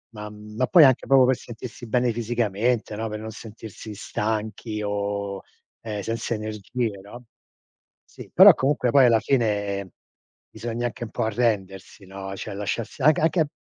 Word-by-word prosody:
Ma, 105 0 -7
mhmm 105 0 -12
ma 130 +3 +1
poi 170 +3 +7
anche 130 -3 +4
proprio 135 -1 +6
per 130 +1 +3
sentirsi 120 +1 -9
bene 120 +2 +1
fisicamente, 115 -1 -1
no, 110 +2 -3
per 105 0 -5
non 110 +1 -7
sentirsi 110 -1 -10
stanchi 105 +1 -3
o, 100 -1 -3 0.4
ehm, 105 -2 -4
senza 115 +3 -3
energie, 110 +1 -3
no. 120 +5 -12 0.8
Sì, - - -13
però - - +10
comunque 135 -2 +1
poi 135 -1 +6
alla 115 -2 +5
fine 100 -6 -1 0.6
bisogna 115 +2 -3
anche 120 0 -7
un 110 - -11
po' - - -2
arrendersi, 100 -4 -2
no, 95 0 -7
cioè 100 - -6
lasciarsi 105 +6 -4
anche 155 +2 +5
anche 160 0 +2
110 Hz, 160 wpm, -24 LUFS, 105-120 Hz, 0.8 s, però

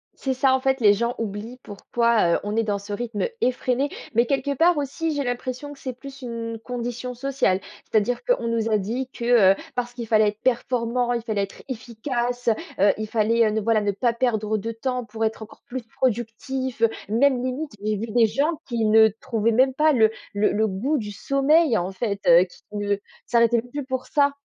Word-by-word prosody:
C'est 265 - -2
ça 260 +1 +3
en 265 - +3
fait, 265 -1 0
les 205 -2 +7
gens 235 +4 -1
oublient 225 +3 -5
pourquoi, 220 -2 +1
heu, - - 0
on 205 +1 -3
est 225 - +3
dans 205 -2 -1
ce 200 +1 -10
rythme 215 0 -2
effréné. 255 +2 0 0.2
Mais 235 +2 +4
quelque 280 +2 0
part 335 +3 +3
aussi, 300 +3 -2
j'ai 285 - 0
l'impression 255 +3 -4
que 285 - -12
c'est 255 - -5
plus 275 0 -11
une 230 -2 -5
condition 245 +1 -4
sociale. 250 -7 0 0.2
C'est-à-dire 225 +3 +1
qu'on - - +1
nous 230 -1 0
a 215 - +3
dit 235 +7 -3
que, 235 -5 +4
heu, - - -9 0.2
parce 245 -1 -2
qu'il 240 -2 -6
fallait 215 -1 +4
être 210 +1 -10
performant, 245 -1 0
il 235 - -1
fallait 215 -3 -1
être 195 - -8
efficace, 245 0 -2
heu. - - +5 0.4
Heu, - - +4
il 215 0 -4
fallait, 225 +1 +2
heu, - - 0
ne 220 +1 0
voilà 225 +1 +2
ne 205 - +1
pas 235 +5 +1
perdre 220 -3 0
de 225 +3 -4
temps, 250 +2 -3
pour 225 +1 -5
être 220 0 -1
encore 220 - -15
plus 255 0 -5
productif. 240 +2 -3
Heu, 230 - +5 0.2
même 245 +4 +3
limite, 260 +4 -3
j'ai 215 +1 0
vu 215 +3 -4
des 230 +1 +4
gens 285 +9 0
qui 235 -3 -1
ne 220 +1 +7
trouvaient 230 -3 0
même 260 +3 +4
pas 305 +3 +3
le 220 -4 +4 0.2
le 205 +1 +2
le 220 +1 +1
goût 235 +10 -1
du 210 -3 -4
sommeil, 275 +3 +3
en 180 +2 -2
fait, 200 0 -3
heu. 170 +1 +8
Qui 180 - -19
ne 205 -1 0 0.3
s'arrêtaient 235 -1 +3
même 245 - -17
plus 285 0 -4
pour 260 -1 -3
ça. 285 -1 +2
235 Hz, 215 wpm, -24 LUFS, 215-260 Hz, 0.4 s, heu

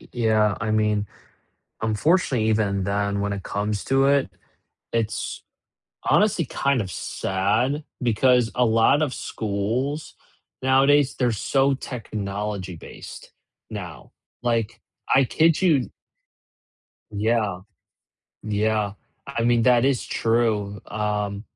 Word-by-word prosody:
y - - -17
yeah, 110 -3 +2
I 110 -1 -1
mean, 105 -1 +1 0.8
unfortunately, 115 - +1
even 100 -3 +1
then 100 +1 -1
when 100 0 -1
it 100 -1 -6
comes 105 0 -2
to 135 0 +3
it, 140 -1 +3 0.6
it's 115 -1 -2 0.6
honestly 200 -5 +3
kind 140 -1 0
of 95 -3 -4
sad, 110 - -1 0.2
because 125 0 +3
a 125 - +3
lot 115 +6 +4
of 145 -4 -1
schools 115 +8 -3 0.5
nowadays, 135 +1 +4
they're 125 -3 +2
so 135 +6 +1
technology-based, 105 -7 -6 0.4
now, 90 - -8 0.3
like, 115 -1 -1 0.3
I 135 - +6
kid 160 +5 +3
you 160 -9 +2 1.2
Yeah. 105 -3 0 0.8
Yeah, 105 -1 0 0.3
I 130 -4 -2
mean, 120 0 +3
that 125 0 +4
is 135 -3 +1
true, 110 -3 0
um, 105 -1 -2
110 Hz, 110 wpm, -24 LUFS, 105-130 Hz, 1.2 s, I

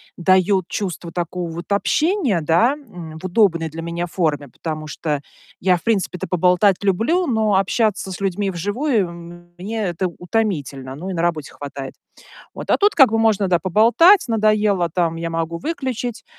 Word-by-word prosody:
даёт 185 +1 +2
чувство 180 -4 -4
такого 175 0 -3
вот 170 +4 -8
общения, 295 - +1
да, 170 - +3
м, 175 - -10
в 185 - -9
удобной 175 -4 +2
для 165 +2 -7
меня 170 +1 -3
форме, 155 -5 -1
потому 155 +4 -6
что 150 -1 -3 0.4
я, 180 0 +3
в - - -15
принципе-то, 195 -5 -1
поболтать 180 +2 +2
люблю, 230 - +1
но 220 -6 +1
общаться 195 0 0
с 185 - -7
людьми 195 +1 -1
вживую- 205 - -1 0.5
мне 215 +5 -4
это 180 0 -1
утомительно. 150 - -2
Ну 180 +6 -6
и - - -3
на 165 -1 -2
работе 160 -4 -1
хватает. 140 -2 -8 0.6
Вот. - - -8
А - - +4
тут 410 +1 +3
как 270 -6 +6
бы 225 - +1
можно, 215 -3 +2
да, 175 -1 +3
поболтать, 235 - +5
надоело 215 -5 +2
там- 170 -2 0
я 165 0 -4
могу 165 0 -3
выключить. 250 - -4
185 Hz, 165 wpm, -20 LUFS, 170-220 Hz, 0.6 s, как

